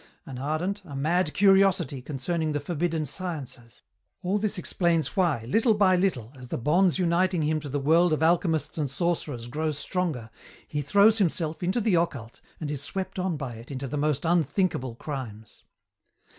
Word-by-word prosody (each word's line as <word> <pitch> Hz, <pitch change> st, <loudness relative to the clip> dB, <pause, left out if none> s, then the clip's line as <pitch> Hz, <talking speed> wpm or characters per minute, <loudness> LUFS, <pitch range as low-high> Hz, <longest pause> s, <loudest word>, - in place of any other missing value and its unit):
An 130 Hz, -2 st, -7 dB
ardent, 165 Hz, +9 st, -2 dB
a 145 Hz, -6 st, -9 dB
mad 160 Hz, +4 st, +1 dB
curiosity 190 Hz, -7 st, +3 dB
concerning 155 Hz, +4 st, -2 dB
the 145 Hz, -, 0 dB
forbidden 165 Hz, +1 st, -2 dB
sciences. 140 Hz, -8 st, -6 dB, 0.4 s
All 190 Hz, +3 st, +1 dB
this 210 Hz, 0 st, 0 dB
explains 170 Hz, -4 st, 0 dB
why, 160 Hz, -, +1 dB
little 220 Hz, -, +3 dB
by 195 Hz, -3 st, +4 dB
little, 145 Hz, -, -1 dB
as 125 Hz, -1 st, -11 dB
the -, -, -3 dB
bonds 170 Hz, +8 st, +3 dB
uniting 180 Hz, -1 st, +1 dB
him 155 Hz, +1 st, +1 dB
to 145 Hz, -1 st, -7 dB
the 145 Hz, +2 st, -1 dB
world 165 Hz, +5 st, +4 dB
of 155 Hz, 0 st, +1 dB
alchemists 165 Hz, -2 st, +1 dB
and 145 Hz, -3 st, 0 dB
sorcerers 145 Hz, -5 st, -2 dB
grow 155 Hz, +5 st, -2 dB
stronger, 150 Hz, -, -3 dB, 0.4 s
he 150 Hz, -, -2 dB
throws 205 Hz, +9 st, +4 dB
himself 165 Hz, -4 st, 0 dB
into 185 Hz, +6 st, 0 dB
the 220 Hz, -3 st, +1 dB
occult 140 Hz, -10 st, -1 dB, 0.2 s
and 150 Hz, -2 st, -4 dB
is 145 Hz, -2 st, -4 dB
swept 190 Hz, +5 st, -4 dB
on 180 Hz, -3 st, -1 dB
by 135 Hz, -4 st, -5 dB
it 115 Hz, +2 st, -11 dB
into 135 Hz, -1 st, -4 dB
the 130 Hz, -, -4 dB
most 150 Hz, 0 st, 0 dB
unthinkable 160 Hz, -6 st, +1 dB
crimes. 115 Hz, -6 st, -8 dB
160 Hz, 170 wpm, -26 LUFS, 140-180 Hz, 0.4 s, by